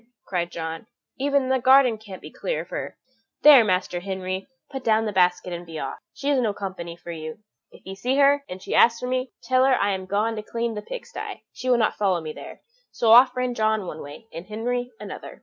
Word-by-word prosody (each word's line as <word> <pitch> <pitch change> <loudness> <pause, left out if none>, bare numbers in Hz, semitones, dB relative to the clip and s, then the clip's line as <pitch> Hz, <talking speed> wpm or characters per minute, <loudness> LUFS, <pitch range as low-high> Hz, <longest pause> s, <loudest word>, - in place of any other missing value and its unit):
cried 175 -2 -2
John, 165 +4 -6 0.3
"even 280 -1 +1
the 260 0 +2
garden 255 -3 +5
can't 200 -4 -11
be - - -9
clear - - -3
of - - -12
her - - -5 0.5
there, 290 -5 +9
Master 185 -3 0
Henry, 190 0 -4 0.2
put 270 -1 -6
down 220 0 +2
the 210 - -1
basket 180 -1 +2
and 175 0 -5
be 165 -2 -9
off, 135 - -5
she 280 - -7
is 275 - +3
no 220 -5 0
company 180 -4 -6
for 175 0 -9
you. 155 -1 -7 0.3
If - - -18
you 190 - -6
see 245 +8 -1
her, 285 0 +4
and 185 +1 -8
she - - -4
asks 230 0 +5
for - - -4
me, 255 0 -2
tell 255 0 +3
her 265 -1 +4
I 205 -4 +1
am 190 -1 -5
gone 215 +3 0
to - - -3
clean 230 +2 -3
the 210 - -5
pig - - -7
sty; - - -7
she 255 - -4
will 245 - +5
not 220 - +1
follow 190 -4 +1
me 155 -1 -6
there." - - -11 0.3
So 225 -2 +2
off 250 +2 +8
ran 250 -1 0
John 220 -3 +1
one - - -7
way, 145 +10 -10
and 170 +2 -8
Henry 245 +3 -2
another. - - -9
215 Hz, 235 wpm, -24 LUFS, 185-250 Hz, 0.5 s, there